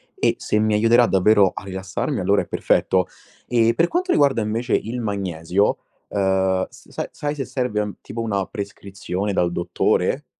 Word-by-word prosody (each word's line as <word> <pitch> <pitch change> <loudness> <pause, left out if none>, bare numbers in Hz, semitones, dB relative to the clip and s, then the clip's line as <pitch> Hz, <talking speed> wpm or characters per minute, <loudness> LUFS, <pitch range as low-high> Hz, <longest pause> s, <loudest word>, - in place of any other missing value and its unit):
e - - +1
se - - 0
mi 110 0 +2
aiuterà 115 +3 +5
davvero 100 -1 +4
a - - -7
rilassarmi 95 0 -3
allora - - +2
è - - -8
perfetto. 95 -1 +1 0.4
E 115 -1 +3
per 170 +1 +3
quanto 365 +1 -1
riguarda 140 -5 +3
invece 115 +3 -2
il 120 +3 -1
magnesio, 95 -2 0 0.3
uhm, 95 -1 +1
s - - -18
sai - - -4
sai 145 0 -3
se 135 -2 -3
serve, 125 -5 -2
ehm, 105 -1 -4
tipo 115 - -8
una 100 -4 -1
prescrizione 100 -2 -5
dal 90 -3 +1
dottore? 85 - 0
105 Hz, 165 wpm, -22 LUFS, 95-115 Hz, 0.4 s, aiuterà